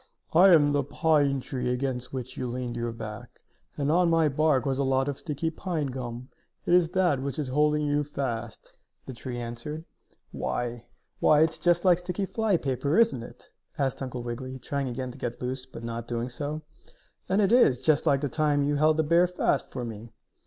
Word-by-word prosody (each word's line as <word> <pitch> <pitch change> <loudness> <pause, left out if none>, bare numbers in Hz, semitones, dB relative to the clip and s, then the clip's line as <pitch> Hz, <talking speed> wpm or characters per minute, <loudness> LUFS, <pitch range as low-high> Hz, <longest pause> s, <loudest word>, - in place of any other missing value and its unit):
"I 180 +4 +7
am 150 -5 +6
the 145 0 +2
pine 145 -2 +2
tree 125 -1 -3
against 125 -1 -2
which 130 -1 -5
you 125 - -3
leaned 125 0 -4
your 120 0 -2
back. 115 +1 -9 0.3
And 145 +1 0
on 175 +1 +4
my 165 -2 +3
bark 150 -1 +2
was 135 -1 0
a - - +2
lot 135 0 +1
of 140 -1 -3
sticky 160 +1 -3
pine 165 -2 -3
gum. 125 -1 -6 0.4
It - - +2
is 175 -2 +5
that 175 -7 +2
which 135 -1 -4
is 145 -4 -2
holding 150 +2 +2
you 145 0 +1
fast," 120 -6 -5 0.3
the 130 - -7
tree 120 +1 -6
answered. 120 +7 -6 0.5
"Why 120 -1 -3 0.3
why, 150 0 +5
it's 160 0 +2
just 175 +1 +2
like 180 -2 +5
sticky 180 +2 -3
flypaper, 165 - 0
isn't 180 - +3
it?" 120 +1 -13 0.3
asked 135 -3 -1
Uncle 125 -2 -4
Wiggily, 130 +2 -5
trying 140 +2 -3
again 125 +1 -4
to - - -13
get 120 0 -4
loose, 130 +1 -4
but 120 -2 -10
not 115 0 -5
doing 120 +1 -2
so. 145 +5 -4 0.7
"And 195 - +2
it 200 -1 +3
is 235 - +5
just 155 -2 +2
like 140 -1 +3
the 145 - 0
time 145 +1 +1
you 145 +1 +1
held 155 +1 +3
the 160 - +3
bear 170 +4 +4
fast 180 -5 0
for 125 -2 -4
me." 115 0 -8
140 Hz, 200 wpm, -27 LUFS, 125-155 Hz, 0.7 s, I